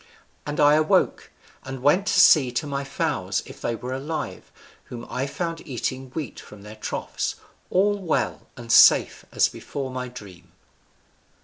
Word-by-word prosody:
And 145 0 -4
I 145 0 +6
awoke, 155 0 +2 0.3
and 130 -1 -7
went 180 +8 +3
to - - +3
see 135 -6 +6
to 150 - -1
my 140 -1 -3
fowls 135 - -2
if - - -12
they 120 - -1
were 125 +3 -6
alive, 150 +4 -5 0.3
whom 120 -1 -8
I 130 +2 -2
found 165 +2 -4
eating 130 0 -4
wheat 150 -9 -5
from 105 -1 -13
their 105 +1 -11
troughs, 110 - -4 0.3
all 205 +2 +2
well 175 -5 -2
and 115 -1 -6
safe - - +6
as - - +3
before 135 -2 -6
my 125 0 -4
dream." 105 -8 -13
135 Hz, 155 wpm, -24 LUFS, 120-155 Hz, 0.3 s, I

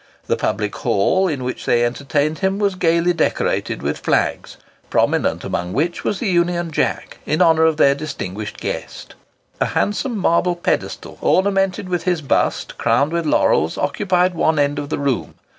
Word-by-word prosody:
The - - +1
Public - - -2
Hall, 185 - +2
in 145 -7 -3
which 125 0 -4
they 120 0 +3
entertained 145 +5 -1
him, 190 0 0
was 200 -1 +1
gaily 170 -1 +2
decorated - - -1
with - - -2
flags, - - -1 0.3
prominent - - +1
amongst 90 +1 -3
which 170 +5 -1
was 205 - -1
the 225 - -2
Union 175 -2 +1
Jack, - - -2
in 155 - 0
honour 165 -2 +5
of 160 -1 +2
their 140 - +5
distinguished 110 -9 -6
guest. - - -6 0.5
A - - +1
handsome 225 +3 0
marble 180 -1 +2
pedestal, 175 - -3
ornamented 195 0 +1
with 175 -2 -2
his 175 -4 0
bust 135 - -1
crowned 130 +6 +2
with 170 -2 -1
laurels, 80 - +2
occupied 180 +3 +1
one 160 -1 +1
end 145 0 +1
of 145 -1 -5
the - - -1
room. 140 -3 -2
165 Hz, 165 wpm, -19 LUFS, 140-185 Hz, 0.5 s, honour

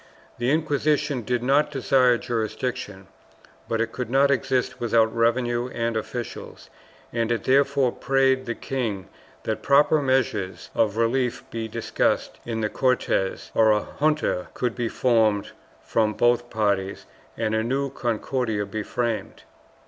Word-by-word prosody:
The 120 +1 +1
Inquisition 150 -2 +1
did 120 +2 -1
not 140 +4 +3
desire 130 -3 +3
jurisdiction, 110 -4 -3 0.6
but 115 - 0
it 115 0 0
could 125 -3 -4
not 140 +2 +4
exist 130 -2 0
without 115 -1 +2
revenue 120 +1 +1
and 115 -2 -2
officials, 115 +1 -6 0.4
and 115 -1 0
it 115 - -1
therefore 140 -1 +3
prayed 135 0 +1
the 120 - -2
king 115 -8 -3 0.3
that 110 - -2
proper 145 +2 +4
measures 105 -9 -1
of 110 -1 +1
relief 120 +2 0
be 115 -1 -3
discussed - - -1
in 115 -1 -2
the 105 - +1
Cortes, 125 -7 0
or 110 -1 +5
a 105 -1 +1
junta 150 -11 +1
could 125 -2 -1
be 120 -2 -2
formed 110 -5 +2 0.3
from 110 -2 +1
both 120 0 +2
parties 100 -3 -1 0.3
and 110 -1 -1
a 110 - +2
new 135 +4 -1
Con 120 -3 -1
cordia 110 -5 -2
be 105 +2 -4
framed. 115 +1 -3
120 Hz, 140 wpm, -24 LUFS, 110-130 Hz, 0.6 s, or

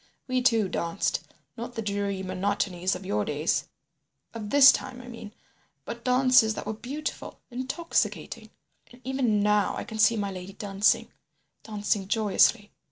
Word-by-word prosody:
We 255 -1 0
two 225 -5 +3
danced, 170 +1 -1 0.3
not 240 +1 -7
the 225 - -2
dreary 200 -2 -2
monotonies 185 -1 -1
of 185 +1 -8
your 105 - 0
days—of 170 - -5
this 280 +1 +9
time, 255 -1 -5
I 250 - -11
mean—but 230 +1 -12
dances 250 -3 +4
that - - -6
were 215 - -3
beautiful, 280 +7 -6
intoxicating. 260 +7 -2 0.4
And 245 +1 -17
even 250 -6 +1
now 210 -1 +2
I - - -3
can 220 - -8
see 225 +2 +5
my 200 -1 -2
lady 185 +1 -8
dancing—dancing 205 0 -2
joyously. 210 0 +2
215 Hz, 135 wpm, -27 LUFS, 200-245 Hz, 0.4 s, this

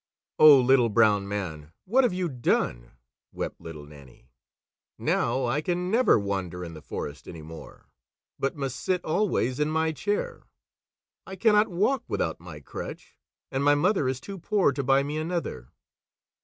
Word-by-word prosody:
"Oh, 150 -3 +9
Little 125 -1 +4
Brown 105 -2 +3
Man, 80 -7 -5
what 255 +8 +3
have 245 - +2
you 180 0 -1
done!" 115 - -1 0.4
wept - - -5
Little 75 -3 -9
Nannie. 70 -4 -16 0.7
"Now 130 -1 0
I 130 +5 0
can 180 +2 -2
never 245 +3 +4
wander 95 -4 -3
in 85 - -8
the 75 - -10
forest 75 0 -7
any 80 -3 -9
more, 80 +1 -12 0.5
but 135 - -1
must 135 -3 -4
sit 180 -1 -1
always 155 - 0
in 150 0 +1
my 160 0 +1
chair. 460 - -3 0.9
I 190 - -7
cannot 210 +2 +4
walk 215 +8 0
without 80 - -2
my 80 -3 -10
crutch, - - -8 0.4
and 135 +1 -1
my 145 0 +5
mother 165 -2 +2
is 130 -1 -3
too 195 +8 -8
poor 190 -2 +2
to 140 +1 -3
buy 135 +1 +3
me 145 +2 -4
another." 155 - -4
135 Hz, 160 wpm, -26 LUFS, -, 0.9 s, Oh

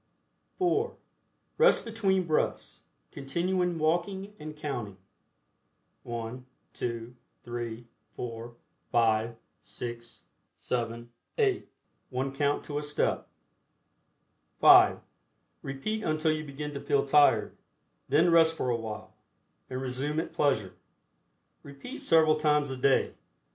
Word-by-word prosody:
(4) 420 +6 +1 0.6
Rest 475 - +5
between 195 -5 +1
breaths, 155 -2 -1 0.3
continuing 175 +5 -1
walking 175 +6 -1
and 150 0 -8
counting, 120 -10 -4 1.1
I, 115 +1 -4 0.3
2, 115 0 -4 0.3
3, 120 -1 -5 0.3
4, 115 0 -6 0.4
5, 115 0 +2 0.5
8, 120 -1 -7 0.3
7, 120 -1 -3 0.3
8, 410 -4 +1 0.4
one 135 +1 -2
count 145 +1 0
to 145 -1 -3
a - - -4
step. 150 0 -1 1.3
(5) - - +7 0.6
Repeat 210 +12 -3
until 155 0 +1
you 155 0 -2
begin 145 +1 -6
to 140 - -4
feel 140 -1 +1
tired. 140 -6 +4 0.5
Then 160 +5 +4
rest 165 -1 +5
for 125 - -1
a - - +2
while, 110 -2 -6 0.6
and 130 0 -3
resume 135 +4 -2
at 165 - -4
pleasure. 110 -11 +1 0.9
Repeat 140 - -9
several 160 -1 +5
times 150 -2 +2
a 130 - -4
day. 135 +1 +2
145 Hz, 110 wpm, -29 LUFS, 120-160 Hz, 1.3 s, 5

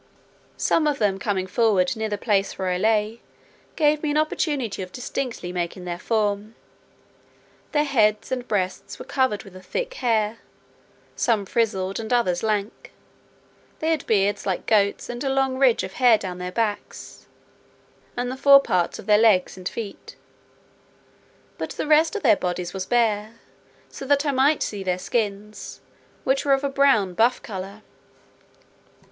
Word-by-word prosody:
Some 310 -2 +2
of 295 -2 0
them 200 -4 0
coming 195 -3 -1
forward 190 -2 +2
near 220 -1 -3
the 205 - -2
place 200 -2 0
where 190 -1 -2
I 180 0 -1
lay, 215 +2 +1 0.5
gave 300 -1 +2
me 305 - -1
an 295 - +1
opportunity 290 - -1
of 185 -1 -7
distinctly 245 -6 -4
marking 180 +1 -4
their 175 -1 -4
form. 210 0 -1 1.2
Their 295 -1 +2
heads 220 -7 +1
and 250 -1 -3
breasts 190 -3 -2
were - - -9
covered 260 -7 0
with 195 -2 -14
a 185 - -10
thick - - -4
hair, 225 - 0 0.8
some 220 -4 +1
frizzled, 195 -3 -1
and 220 0 -6
others 185 -8 +1
lank; 210 -1 -3 0.8
they 320 +1 -1
had 315 -3 -2
beards 205 -1 +1
like 185 -2 -2
goats, 200 -2 +2
and 240 +2 -5
a 270 - 0
long 265 -1 0
ridge 260 -4 +4
of - - -6
hair 245 -4 +5
down 180 -3 -6
their 180 0 -4
backs, 215 0 -4 0.9
and 245 +1 -2
the 260 - -6
fore 275 +1 +8
parts 185 -10 0
of - - -10
their 210 0 +5
legs 210 -5 +3
and 185 0 -5
feet; 215 -4 -8 1.4
but - - -3
the - - -3
rest 315 +3 +4
of 420 - -3
their - - +6
bodies 180 -8 -3
was 190 -1 -4
bare, 220 -2 +1 0.5
so - - -10
that 285 +2 +2
I 285 - +2
might 275 +3 +3
see 205 -2 -4
their 185 -1 -1
skins, 210 0 -4 0.4
which 265 +1 +1
were 280 - +3
of 270 +1 +1
a 280 - 0
brown 270 -9 +3
buff 230 +6 +2
colour. 200 0 -7
220 Hz, 165 wpm, -23 LUFS, 195-260 Hz, 1.4 s, fore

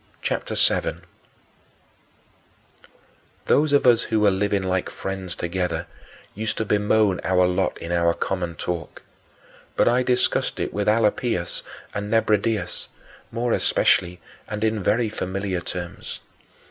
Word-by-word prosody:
CHAPTER - - -2
VII - - +6 0.2
11. - - -9 2.4
Those 150 +1 +3
of 145 - +3
us 120 -2 +6
who 110 - 0
were 105 -1 +4
living 100 0 0
like 95 0 -1
friends 95 -2 -5
together 90 +1 -2 0.5
used 110 +1 -3
to 110 - -1
bemoan 105 -2 +2
our 90 -1 +3
lot 90 +1 0
in 85 - -6
our 85 -1 +2
common 90 -3 -2
talk; 85 +2 -5 0.7
but - - +3
I 120 +2 +4
discussed 125 0 +1
it - - -2
with 105 0 -1
Alypius 105 -4 +1 0.3
and 105 0 -4
Nebridius 105 -3 +1 0.4
more 120 0 0
especially 90 -1 +2 0.3
and 105 0 -4
in 110 -1 +1
very 110 +5 +2
familiar 95 -3 -3
terms. 90 0 -6
100 Hz, 130 wpm, -23 LUFS, 90-110 Hz, 2.4 s, VII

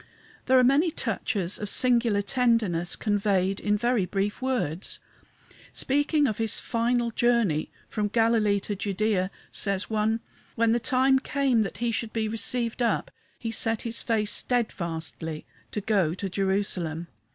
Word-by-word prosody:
There 260 0 +5
are 255 - +6
many 280 +7 +4
touches 200 - -1
of 210 - -1
singular 235 -5 +3
tenderness 215 -8 +1
conveyed 195 -2 0
in 210 0 +1
very 235 -3 +1
brief 200 +4 -2
words. 230 - -1 0.8
Speaking 290 +2 +2
of 215 -5 -1
his 225 -1 +2
final 235 0 0
journey 230 -10 +1 0.2
from 210 -1 -2
Galilee 220 -2 +2
to 205 - -4
Judæa, 200 -1 0 0.2
says 200 +1 -1
one: 220 +1 +1 0.3
"When 230 -1 +2
the 235 - +2
time 265 +2 +3
came 265 -4 +1
that 200 - -3
he 235 0 -1
should 225 0 -3
be 220 -1 -1
received 230 +2 -1
up 235 - 0 0.3
he 225 - -4
set 225 -1 +1
his 230 -1 -1
face 215 -2 0
steadfastly 165 -9 -2 0.2
to 210 - -4
go 195 -6 +1
to 195 - -4
Jerusalem." 190 -4 -1
220 Hz, 145 wpm, -26 LUFS, 195-240 Hz, 0.8 s, are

